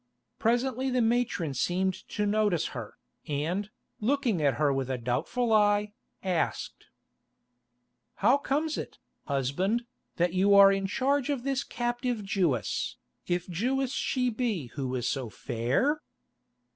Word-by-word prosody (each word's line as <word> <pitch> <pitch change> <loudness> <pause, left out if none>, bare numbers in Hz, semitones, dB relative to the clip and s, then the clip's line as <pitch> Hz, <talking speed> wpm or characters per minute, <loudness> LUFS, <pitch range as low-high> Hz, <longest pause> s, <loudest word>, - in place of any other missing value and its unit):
Presently 255 +3 +1
the 255 0 +1
matron 230 - +1
seemed 180 +7 +1 0.2
to 210 - -1
notice 205 -5 +1
her, - - -7 0.3
and, 165 +8 -1 0.3
looking 235 - +1
at 140 -2 +3
her 145 -2 +2
with 135 -1 -2
a 130 - -1
doubtful 175 - 0
eye, 205 0 +3 0.3
asked: 180 -3 -2 1.3
"How 245 +8 +4
comes 300 +3 -1
it, - - -7 0.3
husband, 155 - 0 0.3
that 175 0 +1
you 195 +2 +4
are 200 0 +9
in 195 0 0
charge 275 +6 +1
of 275 -4 -1
this 275 0 0
captive 240 -2 -2
Jewess, 165 - 0 0.3
if 175 0 -1
Jewess 250 +9 0
she 250 -2 0
be 215 - -2
who 130 -3 -3
is 120 - -1
so 130 -4 -2
fair?" 130 - 0
205 Hz, 130 wpm, -29 LUFS, 155-245 Hz, 1.3 s, are